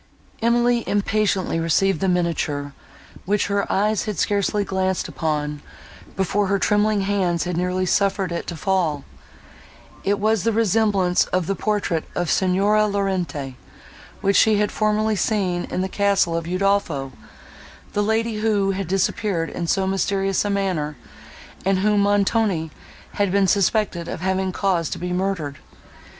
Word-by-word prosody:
Emily 240 0 +2
impatiently 200 -4 0
received 165 +2 +2
the 195 - +1
miniature, 160 -5 -1 0.5
which 205 +2 +1
her 200 0 0
eyes 210 -1 +1
had 210 -4 -4
scarcely 205 0 +1
glanced 190 -1 -1
upon, 150 -2 -2 0.5
before 195 +1 0
her 200 +1 +2
trembling 210 +1 +2
hands 190 -4 0
had 180 -1 -3
nearly 180 +1 0
suffered 195 0 +1
it 170 - -4
to 170 - -4
fall—it 185 +3 -4
was 215 0 +1
the 230 - +2
resemblance 205 -4 +2
of 185 -2 -1
the 195 - 0
portrait 200 -5 -1
of 175 -2 -1
Signora 200 +3 +2
Laurentini, 185 -9 -2 0.7
which 200 0 +2
she 215 -1 +5
had 210 0 +1
formerly 215 0 +1
seen 190 -4 0
in 185 - -3
the 190 - -1
castle 200 -3 +1
of 165 0 -3
Udolpho—the 185 -1 -3
lady, 220 +1 0
who 205 -3 +1
had 195 -2 -3
disappeared 190 -2 0
in 170 - -4
so 190 +3 +1
mysterious 195 0 0
a 205 - -2
manner, 180 -8 -1 0.7
and 195 0 +2
whom 205 +2 +2
Montoni 200 -4 +1 0.5
had 200 -2 +2
been 200 0 +3
suspected 195 -2 +1
of - - -5
having 190 0 0
caused 180 -4 0
to - - -6
be 180 0 -3
murdered. 180 -6 -2
195 Hz, 140 wpm, -22 LUFS, 175-205 Hz, 0.7 s, she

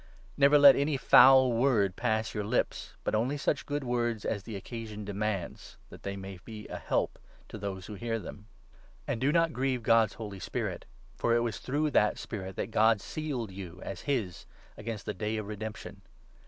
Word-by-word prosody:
Never 140 +1 +6
let 140 -1 +9
any 140 0 +1
foul 130 -1 +7
word 115 -6 +2
pass 110 -2 -1
your 105 - -2
lips, 110 +5 -2
but - - -1
only 120 +7 +1
such 145 +2 0
29 - - -32 0.2
good 130 - -7
words 120 -3 -1
as 100 - -1
the 110 +2 -8
occasion 105 +1 -7
demands, 100 -2 -4
that - - -12
they 100 0 -4
may 95 -1 -8
be 110 0 -9
a - - -5
help - - -1 0.3
to 110 - -8
those 95 -2 -5
who 105 - -8
hear 115 +3 -2
them. 105 -1 -9 0.6
And 115 - -3
do 140 +2 +3
not 165 0 +2
grieve 130 -2 -1
God's 115 -1 +4
Holy 105 -4 -7
Spirit; - - -4 0.3
30 - - -26
for 115 - +2
it 120 - +3
was 115 -3 -2
through 150 +3 -1
that 105 -5 +3
Spirit 95 -4 -6
that 110 - -4
God 110 0 +4
sealed 125 -1 -4
you 95 -2 -8
as 95 -3 -6
his, 115 -11 -2 0.3
against 115 -4 -6
the 105 - -2
Day 110 +1 -2
of 110 - -4
Redemption. 105 0 -7
110 Hz, 195 wpm, -30 LUFS, 100-125 Hz, 0.6 s, let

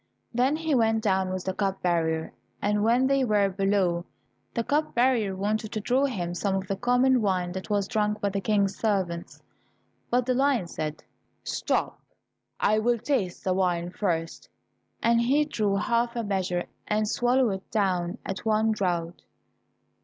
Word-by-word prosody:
Then 255 +5 +2
he 320 -1 -1
went 225 -3 +2
down 190 -3 +1
with 185 -1 -3
the 190 - -1
cup 195 -1 -2
bearer, 160 -2 0 0.3
and 210 0 +1
when 240 +4 +3
they 275 0 +2
were 210 -4 +2
below, 195 -3 +1 0.5
the 235 - -1
cup 295 +5 0
bearer 235 -5 +2
wanted 210 +3 -2
to 215 - -1
draw 250 +6 +2
him 180 -10 -3
some 195 +2 -1
of 190 -1 -3
the 195 - -1
common 250 +3 +3
wine 185 -3 0
that 190 +1 -6
was 205 -2 +1
drunk 210 -2 0
by 200 - 0
the 195 0 -2
King's 200 -1 +1
servants, 190 -6 -2 0.7
but 245 0 +2
the 255 - +1
lion 265 -5 +2
said, 155 -2 -5 0.4
"Stop, - - -1 0.6
I 215 +1 +3
will 240 +2 +2
taste 230 -7 -2
the 185 - +1
wine 175 -2 0
first," 165 -4 -3 0.5
and 235 0 +4
he 280 +5 +3
drew 210 -9 0
half 235 +3 0
a 235 - -1
measure, 185 -3 -1 0.2
and 215 0 +1
swallowed 245 +1 +2
it 190 0 -6
down 185 -2 0
at 195 - -4
one 220 0 +2
draught. 175 -5 -2
205 Hz, 170 wpm, -27 LUFS, 185-235 Hz, 0.7 s, and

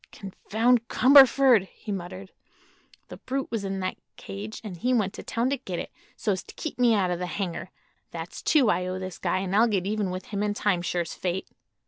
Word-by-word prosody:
"Confound 225 +4 0
Cumberford!" 265 -5 +6
he 210 - -9
muttered. 190 0 -6 0.8
"The - - -9
brute 270 +1 -4
was 225 -3 -2
in 195 -1 -3
that 185 - -3 0.2
cage, 205 +2 -7
and 205 -5 -6
he 250 +9 +1
went 205 -4 0
to - - -8
town 240 +3 -1
to 280 - +1
get 190 -9 -6
it, - - -5 0.2
so's 200 -4 -1
to - - -13
keep 315 - -6
me 240 -2 +5
out 185 -3 +1
of 175 - -2
the 180 - -3
hangar. 185 -1 -4 0.4
That's 165 0 -7
two 265 -9 +4
I 180 0 -1
owe 185 0 -3
this 185 -1 -6
guy, 185 - 0
an' 190 -1 -3
I'll 225 +4 +5
get 195 -5 0
even 205 -1 -1
with 185 +1 -5
him 200 -1 -2
in 205 0 0
time, 195 -5 +1
sure's 175 -1 -2
fate." 185 +1 -3
200 Hz, 210 wpm, -26 LUFS, 185-230 Hz, 0.8 s, Cumberford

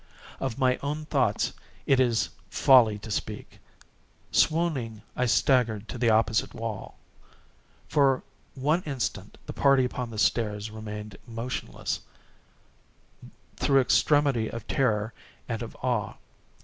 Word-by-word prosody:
Of 130 -4 -3
my 130 -1 +2
own 150 +2 -4
thoughts - - +1 0.3
it 135 - +4
is 115 -5 +2 0.2
folly 120 -3 +5
to 105 +1 -9
speak. - - -5 0.7
Swooning, 140 -10 +1
I 125 - +1
staggered 115 -4 +2
to 125 - -6
the 120 -1 +3
opposite 110 0 +2
wall. 115 -2 -5 0.9
For 135 -3 +3 0.3
one 150 +6 +1
instant 135 -5 -3
the - - -6
party 140 -2 +4
upon 125 -1 -4
the 110 - -8
stairs 105 -1 0
remained 105 -2 -7
motionless, 115 +2 -4 1.6
through 135 -1 +4
extremity 140 -3 +3
of 115 -1 -7
terror 110 -4 +1 0.3
and - - -3
of - - -7
awe. - - -1
120 Hz, 120 wpm, -27 LUFS, 110-135 Hz, 1.6 s, folly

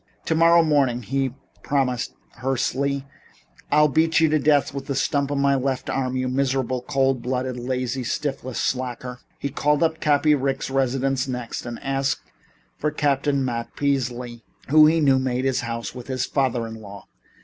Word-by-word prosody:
"Tomorrow 165 +1 +5
morning," 135 -6 +2
he 135 +2 -1 0.3
promised 130 -4 -1 0.2
hoarsely, 135 +2 -1 0.7
"I'll 150 0 +5
beat 160 +3 +2
you 160 -1 +4
to 155 0 +2
death 145 -1 +2
with 135 -1 -6
the 140 - -2
stump 140 +1 0
of 145 - -1
my 140 0 +3
left 135 -1 -1
arm, 130 -1 -1
you 130 0 -1
miserable, 130 -1 0
cold 135 -2 +1
blooded, 130 0 -2
lazy, 130 +1 -2
shiftless 130 +1 -3
slacker." 125 -1 -3 0.2
He 140 - -3
called 145 +2 +1
up 160 -1 +1
Cappy 150 +1 +3
Ricks' 135 -1 -1
residence 135 0 0
next, 125 -2 -5
and 120 -1 -5
asked 135 0 -2 0.5
for 150 - +1
Captain 140 -2 +1
Matt 115 -2 -4
Peasley, 125 -4 -2 0.3
who, 155 +1 +7
he 165 +1 +3
knew, 135 -3 +4
made 130 0 -1
his 135 -1 +1
home 115 -1 -4
with 125 -1 -9
his 130 -2 -1
father 130 -4 0
in 110 0 -8
law. 100 -1 -11
135 Hz, 165 wpm, -23 LUFS, 125-140 Hz, 0.7 s, who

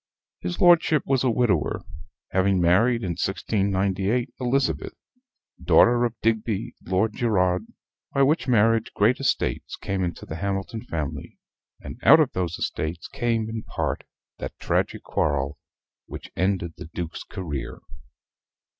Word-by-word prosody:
His 90 0 -4
lordship 165 -4 +5
was 135 -2 +1
a 130 - +3
widower, 110 - +1 0.5
having 95 0 +2
married, 105 +8 +3
in 95 - -2
1698, 100 +6 0
Elizabeth, 130 +2 0 0.7
daughter 120 0 +5
of 115 -1 -4
Digby 110 -2 0
Lord 95 +4 +1
Gerard, 90 -6 +1 0.4
by 140 - +3
which 150 +3 +2
marriage 115 -1 +3
great 110 +5 +3
estates 135 - -1
came 95 -1 -3
into 85 -1 -4
the 80 - -6
Hamilton 100 +4 -3
family; 75 -4 -5 0.4
and - - -9
out - - +8
of - - +3
these 90 -2 -2
estates 80 +2 -3
came, 115 -2 -1
in 110 0 -4
part, - - -3 0.4
that - - -6
tragic - - -1
quarrel 70 -1 -1 0.5
which - - -9
ended 90 -2 0
the 90 - -8
Duke's 85 -2 -4
career. 70 -8 -5
100 Hz, 130 wpm, -25 LUFS, 90-120 Hz, 0.7 s, out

